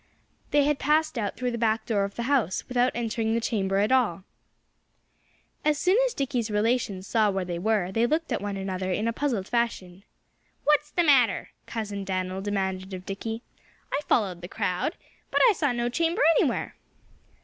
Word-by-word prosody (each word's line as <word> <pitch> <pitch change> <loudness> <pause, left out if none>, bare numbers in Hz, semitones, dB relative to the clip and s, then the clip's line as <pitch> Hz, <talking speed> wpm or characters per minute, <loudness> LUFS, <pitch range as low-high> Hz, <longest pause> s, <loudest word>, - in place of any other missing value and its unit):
They 290 -1 +4
had 295 0 +1
passed 310 +2 +2
out 205 -3 -3
through 250 -1 -1
the 235 - -4
back 225 -1 +1
door 205 -4 +1
of 200 - -8
the 235 - -3
house, 245 - 0
without 250 0 +2
entering 225 -1 -1
the - - +2
chamber 195 -4 0
at 205 +4 +2
all! 220 -9 +2 1.4
As 300 -1 +2
soon 370 +5 +3
as - - -6
Dickie's 250 -5 -1
relations 210 -3 0
saw 215 0 +2
where 190 -2 -1
they 175 -1 -4
were 205 -2 +1
they 225 +4 +2
looked 320 +4 -1
at - - -1
one 200 -1 -3
another 190 -1 -3
in 210 +5 0
a 230 - 0
puzzled 230 -8 -1
fashion. 215 -6 -2 0.6
"What's 295 0 +3
the 345 - +1
matter?" 255 - +3 0.2
Cousin 205 -3 -4
Dan'l 185 0 -2
demanded 190 -1 -2
of 185 0 -9
Dickie. 225 +4 -5 0.5
"I - - +2
followed 190 -6 +1
the 175 - -6
crowd. 185 - -2 0.3
But - - +2
I 450 - +6
saw 290 -7 0
no 240 0 -1
chamber 330 - +1 0.2
anywhere." - - 0
225 Hz, 180 wpm, -26 LUFS, 195-255 Hz, 1.4 s, I